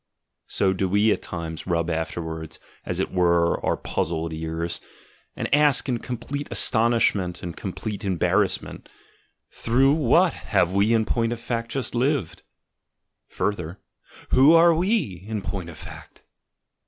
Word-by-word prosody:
so 95 Hz, -1 st, +1 dB
do 95 Hz, 0 st, -1 dB
we 105 Hz, +3 st, +3 dB
at -, -, 0 dB
times 80 Hz, -1 st, -6 dB
rub 85 Hz, -2 st, 0 dB
after 80 Hz, 0 st, -2 dB
wards, 80 Hz, -1 st, -7 dB, 0.3 s
as -, -, -2 dB
it -, -, -1 dB
were, 85 Hz, -2 st, +2 dB
our -, -, +1 dB
puzzled 80 Hz, 0 st, -2 dB
ears, 80 Hz, +1 st, -4 dB, 0.5 s
and -, -, -3 dB
ask 145 Hz, -1 st, +4 dB
in 125 Hz, -3 st, 0 dB
complete 130 Hz, +4 st, -5 dB
astonishment 110 Hz, -6 st, +1 dB
and 85 Hz, -1 st, -5 dB
complete 100 Hz, +2 st, -5 dB
embarrassment, 95 Hz, -4 st, 0 dB, 0.6 s
"Through 135 Hz, +4 st, +2 dB
what 160 Hz, +4 st, +3 dB
have 95 Hz, -4 st, 0 dB
we 100 Hz, +3 st, +3 dB
in 110 Hz, -1 st, +3 dB
point 115 Hz, 0 st, 0 dB
of 120 Hz, -, -7 dB
fact 115 Hz, 0 st, -3 dB
just 130 Hz, -2 st, -3 dB
lived?" 130 Hz, -, 0 dB, 0.9 s
further, 90 Hz, -3 st, -3 dB, 0.5 s
"Who 135 Hz, +5 st, +6 dB
are 170 Hz, +1 st, +7 dB
we 165 Hz, -, 0 dB
in 110 Hz, -3 st, -3 dB
point 90 Hz, 0 st, -4 dB
of 80 Hz, -, -11 dB
fact?" -, -, -12 dB
100 Hz, 140 wpm, -24 LUFS, 85-120 Hz, 0.9 s, are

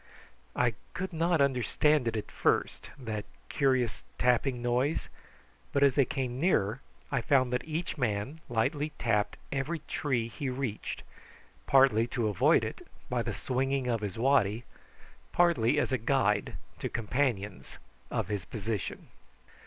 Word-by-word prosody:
I 125 Hz, -2 st, +2 dB, 0.2 s
could 190 Hz, 0 st, -3 dB
not 165 Hz, -1 st, +2 dB
understand 140 Hz, +1 st, +2 dB
it 115 Hz, -1 st, 0 dB
at 105 Hz, -, -5 dB
first, -, -, 0 dB
that 110 Hz, -6 st, -4 dB, 0.3 s
curious 130 Hz, -5 st, +1 dB, 0.2 s
tapping 125 Hz, +1 st, +2 dB
noise; 125 Hz, +5 st, 0 dB, 0.6 s
but 140 Hz, -, +2 dB
as 140 Hz, -2 st, +5 dB
they 135 Hz, +1 st, +4 dB
came 130 Hz, -2 st, -3 dB
nearer 130 Hz, -, +2 dB, 0.3 s
I 135 Hz, -3 st, +1 dB
found 130 Hz, 0 st, +3 dB
that 125 Hz, -, 0 dB
each 160 Hz, 0 st, -3 dB
man 125 Hz, +6 st, -1 dB
lightly 145 Hz, +6 st, 0 dB
tapped 105 Hz, -3 st, 0 dB
every 140 Hz, +5 st, -1 dB
tree 125 Hz, -6 st, 0 dB
he 130 Hz, +4 st, -4 dB
reached, 125 Hz, -4 st, -4 dB, 0.6 s
partly 130 Hz, -4 st, +5 dB
to 115 Hz, -3 st, +2 dB
avoid 100 Hz, -, +4 dB
it, -, -, -5 dB, 0.3 s
by -, -, +1 dB
the -, -, -2 dB
swinging 135 Hz, 0 st, -1 dB
of 115 Hz, -2 st, 0 dB
his 100 Hz, -2 st, -4 dB
waddy, 120 Hz, -3 st, +2 dB, 0.7 s
partly 150 Hz, -7 st, +3 dB
as -, -, 0 dB
a 130 Hz, -, +1 dB
guide 110 Hz, -4 st, +1 dB, 0.2 s
to -, -, -2 dB
companions 115 Hz, -4 st, -2 dB, 0.3 s
of -, -, -1 dB
his 100 Hz, -3 st, -2 dB
position. 110 Hz, -2 st, -4 dB
125 Hz, 140 wpm, -30 LUFS, 110-140 Hz, 0.7 s, as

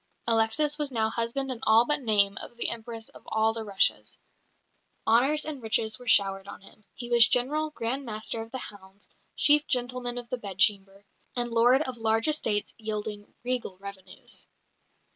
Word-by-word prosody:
Alexis 235 Hz, +7 st, +2 dB
was 295 Hz, -2 st, -2 dB
now 220 Hz, -2 st, 0 dB
husband 240 Hz, +4 st, -2 dB
in 245 Hz, -, -5 dB
all 225 Hz, +2 st, +5 dB
but 295 Hz, +1 st, +1 dB
name 205 Hz, -4 st, +3 dB
of 240 Hz, -, -10 dB
the -, -, +1 dB
Empress 225 Hz, -1 st, -6 dB
of -, -, -15 dB
all 220 Hz, +1 st, +1 dB
the 225 Hz, -1 st, -5 dB
Russias; 200 Hz, -2 st, +2 dB, 0.9 s
honours 270 Hz, +7 st, +3 dB
and 295 Hz, -4 st, -6 dB
riches 220 Hz, 0 st, 0 dB
were 250 Hz, -, -13 dB
showered 195 Hz, -2 st, +3 dB
on 200 Hz, -, -9 dB
him; 205 Hz, +2 st, -17 dB
he 240 Hz, -, -6 dB
was 235 Hz, -1 st, +8 dB
General, 285 Hz, +5 st, +1 dB
Grandmaster 230 Hz, -3 st, -3 dB
of 225 Hz, -, -9 dB
the 260 Hz, -, -5 dB
Hounds, 200 Hz, -4 st, -11 dB, 0.3 s
Chief 295 Hz, 0 st, +4 dB
Gentleman 245 Hz, -1 st, -2 dB
of 245 Hz, -1 st, -6 dB
the 255 Hz, -, -3 dB
Bedchamber, 195 Hz, 0 st, 0 dB, 0.3 s
and 240 Hz, -1 st, -1 dB
lord 245 Hz, +5 st, +4 dB
of 260 Hz, -4 st, -6 dB
large 225 Hz, +1 st, +1 dB
estates 225 Hz, -9 st, 0 dB
yielding 210 Hz, -1 st, -5 dB
regal 245 Hz, -6 st, -3 dB
revenues. 195 Hz, -1 st, -5 dB
230 Hz, 165 wpm, -27 LUFS, 210-250 Hz, 0.9 s, was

